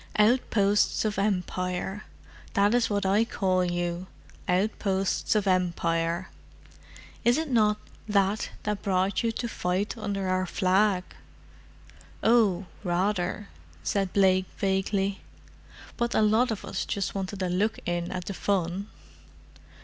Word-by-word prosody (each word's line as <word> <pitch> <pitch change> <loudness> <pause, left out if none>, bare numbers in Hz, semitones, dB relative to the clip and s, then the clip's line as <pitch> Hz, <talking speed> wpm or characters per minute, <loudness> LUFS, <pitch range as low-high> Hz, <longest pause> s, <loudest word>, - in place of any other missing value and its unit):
Outposts 210 -2 +3
of 210 -2 -1
Empire: 185 0 -2 0.5
that 200 +2 +4
is 245 -1 +2
what 200 -1 0
I 200 +3 +4
call 185 -5 +1
you: 175 0 -2 0.4
outposts 195 +1 0
of 210 -2 +2
Empire. 170 -1 0 0.9
Is 240 +1 +4
it 315 -3 -2
not 210 -3 +3 0.3
that 200 0 +1
that 210 -1 -2
brought 190 0 +1
you 230 - +1
to 235 - -3
fight 190 0 -1
under 200 -4 -3
our 185 0 0
flag?" 190 +1 +2 1.2
"Oh, 210 -5 +4 0.2
rather," 185 +2 -1 0.3
said 195 -2 0
Blake 185 -1 +4
vaguely. 195 0 0 0.8
"But 235 0 0
a 220 - +4
lot 220 +4 +3
of 220 -3 -4
us 190 - -3
just 200 -2 -2
wanted 195 0 -3
a 180 - 0
look 200 +5 +1
in 175 0 -2
at 180 -1 -4
the 195 - -4
fun!" 190 0 -1
195 Hz, 125 wpm, -27 LUFS, 185-210 Hz, 1.2 s, that